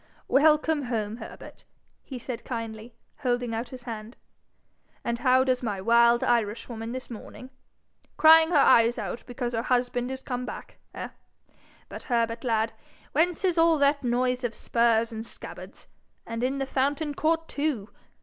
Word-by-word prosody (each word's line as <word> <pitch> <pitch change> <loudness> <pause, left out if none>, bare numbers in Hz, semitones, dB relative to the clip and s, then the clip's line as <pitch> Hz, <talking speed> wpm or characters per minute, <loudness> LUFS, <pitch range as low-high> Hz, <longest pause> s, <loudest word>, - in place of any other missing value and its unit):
'Welcome 300 0 +3
home, 220 -3 -2
Herbert!' - - -11 0.4
he 265 - -8
said, 240 -1 -6
kindly, 230 -1 -6 0.2
holding 245 -3 -1
out 230 +2 -3
his 255 -1 -10
hand. 225 -1 -7 0.9
'And 235 0 -2
how 255 0 +4
does 255 -1 +1
my 210 -5 -2
wild 235 +3 +4
Irishwoman 225 0 -1
this 255 0 -7
morning? 255 +3 -10 0.7
Crying 320 0 +7
her 340 - +3
eyes 235 -3 +5
out - - -5
because 245 -1 -4
her 225 - 0
husband 245 0 0
is 265 0 -6
come 250 -1 -3
back, - - -8 0.2
eh? - - -5 0.8
But, - - -8
Herbert, 230 -1 0
lad, 225 -2 0 0.4
whence 350 +4 +1
is 355 -3 +2
all 330 -1 +5
that 285 0 +2
noise 250 +1 0
of 240 -2 -2
spurs 230 -1 +2
and 220 0 -5
scabbards - - -10 0.4
and 230 0 -5
in 265 +2 0
the 270 - -1
fountain 285 +3 -1
court, 325 +2 0
too? 280 -9 -2
245 Hz, 155 wpm, -27 LUFS, 230-275 Hz, 0.9 s, Crying